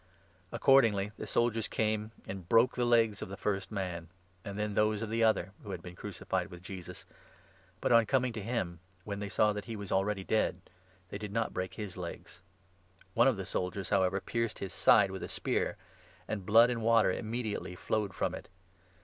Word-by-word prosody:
Accordingly 110 -7 +4
the - - -5
soldiers 115 -2 +1
32 - - -12
came 110 0 0 0.2
and 95 -3 -7
broke 115 +2 +5
the 125 - +1
legs 115 -4 +3
of - - -5
the 100 - -7
first 100 -2 -2
man, 90 -5 -3 0.4
and 100 0 -6
then 105 0 -1
those 105 +1 +2
of 110 - -4
the 115 0 +2
other 110 -4 +2
who 105 - -10
had 90 -3 -5
been 90 0 -9
crucified - - -3
with 90 0 -11
Jesus; 90 -1 -8 0.8
but, - - +1
on 115 -2 +6
coming 130 -1 +2
33 110 - -5
to 105 - -6
him, 85 -8 -2 0.2
when 100 0 -4
they 100 -1 -4
saw 105 0 +3
that 105 0 -5
he 115 - -5
was 100 -2 -7
already 95 0 +1
dead, 100 -3 +1 0.5
they 100 - -5
did 105 -1 -6
not 115 +1 -1
break 95 0 -3
his 105 -5 -6
legs. 85 0 -8 0.7
One 120 +3 +5
of 130 -6 +3
the 95 - -4
soldiers, 95 +2 -3
however, 95 -1 +3
pierced 115 +1 -2
his 95 -4 -5
34 - - -8
side - - +6
with - - -6
a - - -5
spear, - - -1 0.5
and 100 -4 -4
blood 115 +3 +7
and 115 -2 -2
water 115 -3 +4
immediately 110 -3 -3
flowed 100 0 -2
from - - -1
it. - - -8
105 Hz, 205 wpm, -32 LUFS, 95-115 Hz, 0.8 s, blood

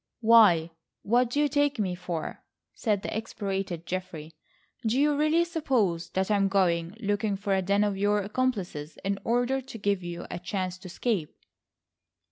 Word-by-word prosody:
"Why, 210 -8 +6 0.3
what 240 +3 +3
do 285 - -1
you 295 - +4
take 290 0 +1
me 195 -4 0
for?" 180 -2 -5 0.3
said 210 -4 -1
the - - -4
exasperated 195 -6 -3
Geoffrey. 165 -3 -5 0.5
"Do 230 +3 +1
you 295 +1 +3
really 310 +3 +3
suppose 250 - 0
that 190 +2 0
I 205 - +4
am 195 -1 +3
going, 180 -1 +1
looking 205 -1 0
for 200 0 -1
a 190 - +2
den 200 +2 +2
of 205 -1 0
your 205 +1 +2
accomplices 200 -9 -2
in 195 0 0
order 245 +3 +1
to 255 -3 -9
give 200 -2 0
you 175 0 -6
a 175 - -4
chance 185 0 -3
to 185 - -10
escape?" 185 -3 -2
200 Hz, 170 wpm, -28 LUFS, 180-235 Hz, 0.5 s, Why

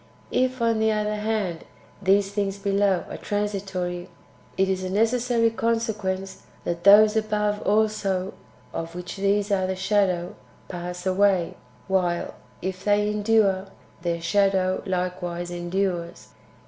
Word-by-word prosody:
If, 255 -1 +1
on 230 -1 +2
the 220 - +2
otlier 210 0 0
hand, 210 -6 -2 0.4
these 195 +1 +3
things 200 -1 -1
[below] 200 -2 +1
are - - -7
transitory, 190 -4 -3 0.5
it 190 - +3
is 190 -1 -1
a 185 - -3
necessary 230 +3 +2
consequence 215 -5 -2 0.2
that 170 0 -3
those 210 +2 +8
[above] 210 -1 0
also, 205 -3 +1 0.4
of 165 +1 -5
which 180 +2 -6
these 200 +1 +1
are 190 -2 +2
the 190 - -2
shadow, 185 -3 +1 0.3
pass 180 0 -6
away; 190 -2 +2 0.3
while, 180 -3 0 0.3
if 185 0 -4
they 210 0 +2
endure, 210 -2 +2 0.3
their 170 -1 -1
shadow 190 +1 +2
likewise 180 -1 -3
endures. 175 0 -3
195 Hz, 125 wpm, -25 LUFS, 185-210 Hz, 0.5 s, those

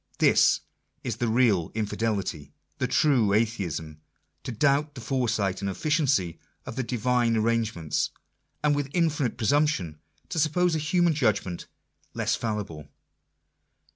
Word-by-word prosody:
This - - +4 0.4
is 115 -4 -3
the 120 - 0
real 110 -7 +2
Infidelity; 100 -9 -2 0.3
the - - +1
true 125 -10 +3
Atheism: 90 -8 -1 0.4
to - - -5
doubt 140 +5 +1
the - - -7
foresight 115 -7 -1
and 100 - -1
efficiency 135 - 0 0.3
of - - -7
the 130 - -1
Divine 120 -1 +1
arrange 115 0 +1
ments, 80 -3 -1 0.5
and 150 -1 +3
with 145 -1 -2
infinite 155 -9 +1
presumption 125 - +1 0.3
to 170 - -2
suppose 165 +3 +2
a 160 - +1
human 170 +2 +2
judgment 100 - 0 0.5
less - - 0
fallible 100 -9 -4
115 Hz, 130 wpm, -26 LUFS, 100-145 Hz, 0.5 s, This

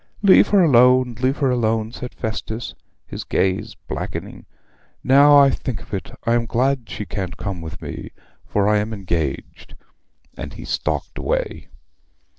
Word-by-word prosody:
'Leave 195 -2 +7
her 200 -3 +4
alone, 125 -3 +5
leave 130 +2 +1
her 135 -3 +1
alone,' 110 -2 0
said 125 0 -7
Festus, 110 +1 -4 0.3
his - - -7
gaze 100 +3 -1
blackening. - - -6 0.6
'Now 145 +2 +7
I 140 -1 +6
think 125 -5 -4
of - - -15
it 95 - -4 0.2
I 115 - +2
am 120 -1 +1
glad 130 +1 0
she 105 - -5
can't 95 -3 -5
come 95 -4 -5
with 80 0 -8
me, - - -7 0.3
for 100 -1 0
I 105 0 +3
am 105 +2 -3
engaged;' 85 -8 -4 0.6
and - - -7
he - - -9
stalked - - -3
away. - - -2
115 Hz, 155 wpm, -21 LUFS, 100-130 Hz, 0.6 s, Leave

